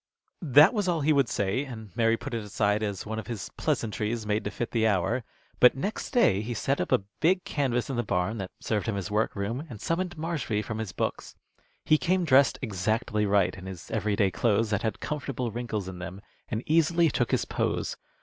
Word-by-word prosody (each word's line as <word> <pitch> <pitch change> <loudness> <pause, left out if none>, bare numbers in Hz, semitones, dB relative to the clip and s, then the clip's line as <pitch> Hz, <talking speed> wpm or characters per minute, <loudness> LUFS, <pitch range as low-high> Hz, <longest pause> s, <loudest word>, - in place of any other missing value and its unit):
That 150 - +6
was 205 -4 0
all 170 -3 +1
he 155 +2 +3
would 140 -5 +3
say, 100 +7 0
and 110 -8 -9
Mary 115 0 +3
put 130 +2 -7
it 115 -2 -2
aside 105 0 0
as 100 -3 -3
one 110 +1 -3
of 110 - -8
his 115 -5 -5
pleasantries 110 0 -1
made 105 +1 0
to - - 0
fit 120 +2 -4
the 110 -2 +2
hour. 105 +5 +1 0.4
But 125 - +7
next 200 +11 -3
day 105 - +3
he 115 +2 -4
set 135 +6 0
up 90 - -3
a - - +3 0.2
big 180 +3 +3
canvas 125 -5 -1
in 135 - -3
the - - +2
barn 105 +2 -1
that 95 -1 -4
served 105 -1 -1
him 105 -3 -1
as 100 +1 -4
workroom, 105 +4 -1
and 110 - -8
summoned 175 - -2
Marshby 150 -10 -2
from 110 +1 -5
his 110 -4 -4
books. - - -3 0.5
He 155 - +4
came 185 0 +1
dressed 140 -2 +5
exactly 105 0 0
right, 100 -2 +3
in 95 0 -9
his 95 -3 -8
every 105 -1 0
day 100 -2 +2
clothes 110 +1 +1
that 105 0 +1
had 110 -1 -2
comfortable 135 -5 -3
wrinkles 110 -4 -3
in 95 -1 -7
them, 95 +2 -7 0.3
and 110 +1 -2
easily 165 +1 +3
took 120 - 0
his - - +1
pose. - - -1
115 Hz, 215 wpm, -28 LUFS, 105-140 Hz, 0.5 s, But